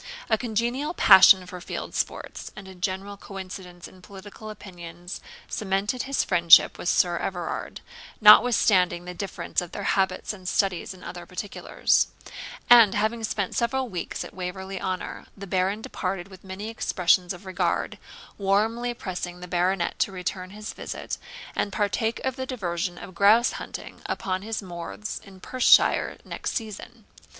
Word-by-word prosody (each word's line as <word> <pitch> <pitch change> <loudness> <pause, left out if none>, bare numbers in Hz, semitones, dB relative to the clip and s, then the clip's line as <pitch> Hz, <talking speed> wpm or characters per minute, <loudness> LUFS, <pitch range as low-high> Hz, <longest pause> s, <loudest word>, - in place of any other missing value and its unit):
A - - +6
congenial 240 +6 -1
passion 190 -1 +8
for 180 0 -9
field - - -6
sports, - - -4
and 195 -2 -10
a 190 - -10
general 190 +2 -4
coincidence 185 -3 -9
in 185 - -17
political 205 +3 -11
opinions, 175 -4 -9 0.3
cemented 205 +4 -1
his 275 - +2
friendship 170 -2 +6
with 175 - -1
Sir 175 -1 +3
Everard, 175 -3 -4 0.4
notwithstanding 210 -5 +6
the 180 - -6
difference 180 -2 -3
of 175 - -9
their 205 - -5
habits 190 +1 0
and 185 -3 -6
studies 190 -1 0
in 180 - -15
other 175 -1 -8
particulars; 185 +2 0 0.6
and, 230 -5 +8
having 220 +2 0
spent 200 -3 -2
several 255 +2 0
weeks 180 -4 -4
at - - -11
Waverley 190 +1 -5
Honour, 185 -1 -4
the 200 - -7
Baron 195 +3 0
departed 185 -1 -4
with 190 -1 -14
many 195 +3 -6
expressions 180 -5 +2
of 185 +1 -8
regard, 185 -1 -1 0.4
warmly 225 +5 +1
pressing 180 -4 -5
the 180 - -8
Baronet 180 0 0
to - - +1
return 185 0 -4
his 210 +2 -7
visit, - - -6 0.4
and 200 - -1
partake 220 +3 0
of 265 0 -1
the 260 0 -4
diversion 175 -7 -3
of 185 - -10
grouse 210 +7 +5
shooting, - - -8
upon 185 -1 -2
his 220 0 -4
moors 175 +4 -6
in 195 -2 -14
Perthshire 255 +6 +4
next - - -4
season. 215 -4 -6
190 Hz, 150 wpm, -25 LUFS, 180-210 Hz, 0.6 s, passion